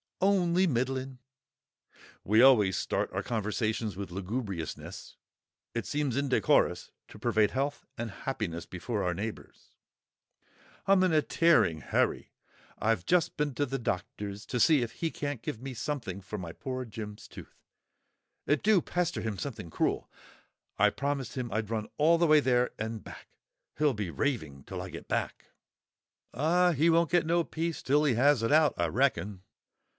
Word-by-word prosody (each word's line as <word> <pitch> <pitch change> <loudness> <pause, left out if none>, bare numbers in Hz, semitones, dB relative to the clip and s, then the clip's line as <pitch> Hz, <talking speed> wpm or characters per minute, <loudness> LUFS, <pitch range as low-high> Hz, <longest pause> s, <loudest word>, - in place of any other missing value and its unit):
"Only 185 -2 +3
middling." 130 -1 -2 1.0
(We 110 +3 +4
always 105 -8 +6
start - - -1
our - - -3
conversations 110 -2 -2
with 100 -2 -6
lugubriousness; 95 -2 -5 0.6
it 115 - -3
seems 145 -4 -1
indecorous 140 -2 +2 0.2
to - - -13
parade 105 -1 +2
health 140 +2 -2
and 120 -1 -3
happiness 100 -8 -4
before 100 +4 -3
our 90 - 0
neighbours!) 105 +4 -7 1.1
"I'm 195 -1 +5
in 185 -3 +2
a 155 - +5
tearing 110 - +3
hurry. - - 0 0.5
I've 110 -5 +1
just 180 -2 +2
been 150 -2 0
to 145 - +1
the 135 0 -3
doctor's 100 -1 -4
to 125 - -2
see 150 +3 +5
if 115 - -4
he 165 - -2
can't 145 -5 -4
give 110 - -5
me 135 0 -6
something 115 -7 -4
for 105 +2 -6
my 90 -4 -6
poor 130 - -5
Jim's 105 -2 -8
tooth. - - -12 0.9
It 145 0 +2
do 210 -2 +5
pester 175 0 -1
him 110 -3 -3
something 115 -8 -6
cruel. - - -1 0.7
I - - +5
promised 140 -3 -3
him 125 -3 -3
I'd 110 0 -2
run 110 -2 -2
all 160 +3 +5
the 170 0 +3
way 155 0 +7
there 125 -3 +2
and 110 0 -4
back; - - -11 0.5
he'll 150 -2 +3
be 105 -5 -3
raving 80 - -2
till - - -6
I - - -6
get - - -9
back." - - -2 0.9
"Ah, 175 +7 +3
he 155 +3 +3
won't 165 -1 +3
get 175 -2 +3
no 170 +1 +2
peace 165 0 -3
till 145 +3 +3
he 140 -6 +2
has 135 +1 +4
it 115 - +1
out, 155 0 +5
I 85 - +1
reckon." 100 - 0
125 Hz, 160 wpm, -30 LUFS, 105-150 Hz, 1.1 s, way